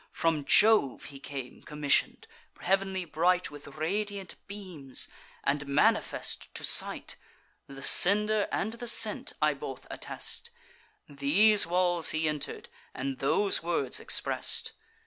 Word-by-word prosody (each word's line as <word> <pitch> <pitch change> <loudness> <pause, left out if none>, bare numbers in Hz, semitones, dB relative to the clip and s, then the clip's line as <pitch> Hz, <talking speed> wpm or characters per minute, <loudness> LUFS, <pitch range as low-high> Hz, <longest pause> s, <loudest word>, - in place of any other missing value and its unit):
From 160 -3 -1
Jove 210 - +4
he 140 -2 -11
came 135 -2 -8
commission'd, 150 -1 0 0.3
heav'nly 190 0 -1
bright 175 +3 0
With 145 0 -11
radiant 195 +6 -3
beams, 180 -10 -2 0.4
and 145 +1 -1
manifest 140 +1 0
to - - -6
sight - - 0 0.5
(The 135 0 -11
sender 210 +5 +5
and 215 +3 -2
the 240 +1 -7
sent 235 - +1
I - - +3
both - - -8
attest) 470 - -4 0.6
These 165 +9 +3
walls 175 -1 +2
he 160 0 0
enter'd, 150 -1 -4 0.3
and 135 0 -4
those 195 +8 +3
words 165 -6 -2
express'd. - - -1
170 Hz, 120 wpm, -28 LUFS, 145-200 Hz, 0.6 s, sender